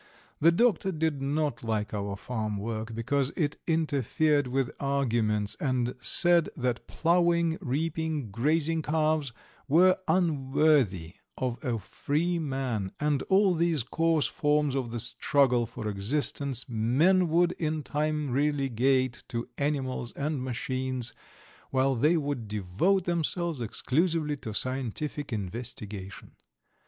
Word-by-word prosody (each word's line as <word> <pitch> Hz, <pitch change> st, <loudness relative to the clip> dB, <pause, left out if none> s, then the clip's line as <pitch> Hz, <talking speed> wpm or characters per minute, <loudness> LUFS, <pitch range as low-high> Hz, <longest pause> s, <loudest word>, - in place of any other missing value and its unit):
The 165 Hz, +3 st, +6 dB
doctor 190 Hz, -1 st, +2 dB
did 160 Hz, -4 st, -1 dB
not 145 Hz, -3 st, -1 dB
like 110 Hz, -2 st, -2 dB
our 100 Hz, -1 st, -3 dB
farmwork, 110 Hz, 0 st, -4 dB
because 130 Hz, +4 st, 0 dB
it 150 Hz, -4 st, 0 dB
interfered 150 Hz, -2 st, +1 dB
with 130 Hz, 0 st, -1 dB
arguments, 115 Hz, -7 st, 0 dB
and 125 Hz, -3 st, 0 dB
said 175 Hz, -2 st, +3 dB
that 125 Hz, -3 st, -2 dB
ploughing, 170 Hz, -1 st, +2 dB
reaping, 155 Hz, -, -2 dB
grazing 155 Hz, +8 st, +1 dB
calves 155 Hz, -2 st, 0 dB, 0.4 s
were 180 Hz, +6 st, +5 dB
unworthy 140 Hz, -, +2 dB, 0.2 s
of 125 Hz, -2 st, -3 dB
a 120 Hz, -3 st, 0 dB
free 155 Hz, -, -1 dB
man, 130 Hz, -10 st, -2 dB
and 150 Hz, -2 st, +1 dB
all 195 Hz, -1 st, +5 dB
these 165 Hz, -5 st, +1 dB
coarse 160 Hz, +4 st, +1 dB
forms 150 Hz, -1 st, +1 dB
of 130 Hz, -3 st, -2 dB
the 120 Hz, +1 st, -4 dB
struggle 125 Hz, 0 st, +2 dB
for 110 Hz, -1 st, -6 dB
existence 130 Hz, +5 st, -1 dB
men 135 Hz, +12 st, +3 dB
would 170 Hz, +2 st, +3 dB
in 155 Hz, -2 st, -1 dB
time 150 Hz, -1 st, -1 dB
relegate 135 Hz, -2 st, +1 dB
to 115 Hz, 0 st, -4 dB
animals 135 Hz, -4 st, -2 dB
and 145 Hz, -1 st, -2 dB
machines, 130 Hz, -1 st, -3 dB, 0.6 s
while 135 Hz, 0 st, +2 dB
they 150 Hz, +8 st, +3 dB
would 140 Hz, -7 st, -3 dB
devote 105 Hz, -, +1 dB
themselves 170 Hz, -3 st, -1 dB
exclusively 150 Hz, -, 0 dB
to 110 Hz, -, -6 dB
scientific 130 Hz, +5 st, -2 dB
investigation. 105 Hz, -2 st, -5 dB
140 Hz, 120 wpm, -28 LUFS, 120-155 Hz, 0.6 s, The